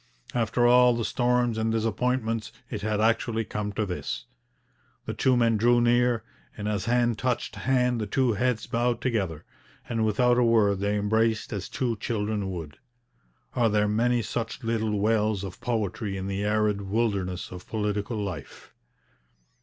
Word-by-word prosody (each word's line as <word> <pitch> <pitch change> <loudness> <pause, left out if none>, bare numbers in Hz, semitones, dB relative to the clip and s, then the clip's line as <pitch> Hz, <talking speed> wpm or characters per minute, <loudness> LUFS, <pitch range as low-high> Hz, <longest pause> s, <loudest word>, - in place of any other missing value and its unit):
After 120 0 +1
all 125 0 +6
the 115 -1 -2
storms 120 0 +1
and 110 0 0
disappointments, 115 0 -1 0.2
it 105 -4 -4
had 105 0 -1
actually 115 0 +1
come 105 0 -3
to 110 +1 -1
this. 90 -10 -4 0.8
The - - -3
two 130 -2 +2
men 115 -2 +3
drew 120 +3 +4
near, 120 0 +3 0.3
and 105 - -4
as 105 -3 -1
hand 120 -1 +2
touched 125 -2 -1
hand 125 -2 +1
the 105 - -2
two 125 +2 +2
heads 115 +2 0
bowed 120 0 0
together, 95 - -2 0.4
and 115 -2 -1
without 120 +3 +3
a - - +4
word 110 -4 +3
they 100 +1 0
embraced 110 +2 +1
as 100 -4 -4
two 120 -4 -1
children 105 -2 -2
would. 80 -6 -7 0.8
Are 120 -2 +3
there 105 0 +2
many 120 +3 +2
such 115 +3 -4
little 110 -2 0
wells 105 -1 +1
of 95 -2 -8
poetry 105 -3 -2
in 95 - -4
the 100 +1 -2
arid 105 -1 +1
wilderness 100 -3 -1
of 90 0 -9
political 105 +1 -2
life? 100 -4 -6
110 Hz, 160 wpm, -26 LUFS, 105-120 Hz, 0.8 s, all